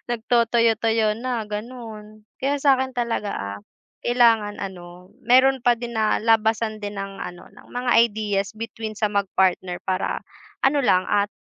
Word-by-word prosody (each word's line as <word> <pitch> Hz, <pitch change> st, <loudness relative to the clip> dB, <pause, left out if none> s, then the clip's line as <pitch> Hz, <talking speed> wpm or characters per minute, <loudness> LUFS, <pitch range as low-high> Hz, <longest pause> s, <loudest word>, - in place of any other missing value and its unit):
nagtotoyo-toyo 230 Hz, -2 st, +2 dB
na, 245 Hz, -1 st, -2 dB
gano'n. 215 Hz, -1 st, -8 dB, 0.2 s
Kaya 275 Hz, +2 st, 0 dB
sa 275 Hz, -3 st, +5 dB
akin 260 Hz, 0 st, -3 dB
talaga, 235 Hz, -4 st, -2 dB
ah, 100 Hz, +1 st, -5 dB, 0.5 s
kailangan 230 Hz, -4 st, +3 dB
ano, 180 Hz, -1 st, -9 dB, 0.2 s
meron 265 Hz, +2 st, +5 dB
pa 245 Hz, -, +5 dB
din 235 Hz, 0 st, -7 dB
na 215 Hz, -1 st, +1 dB
labasan 220 Hz, -1 st, +2 dB
din 205 Hz, 0 st, -6 dB
ng 195 Hz, 0 st, -7 dB
ano, 175 Hz, -2 st, -8 dB
ng -, -, -17 dB
mga 245 Hz, 0 st, -1 dB, 0.2 s
ideas 205 Hz, -1 st, -2 dB
between 220 Hz, 0 st, -6 dB
sa 210 Hz, 0 st, -1 dB
mag-partner 190 Hz, -2 st, 0 dB
para 185 Hz, 0 st, -2 dB, 0.4 s
ano 275 Hz, +2 st, +3 dB
lang, 185 Hz, -5 st, +4 dB
at 205 Hz, 0 st, +3 dB
220 Hz, 145 wpm, -23 LUFS, 205-235 Hz, 0.5 s, sa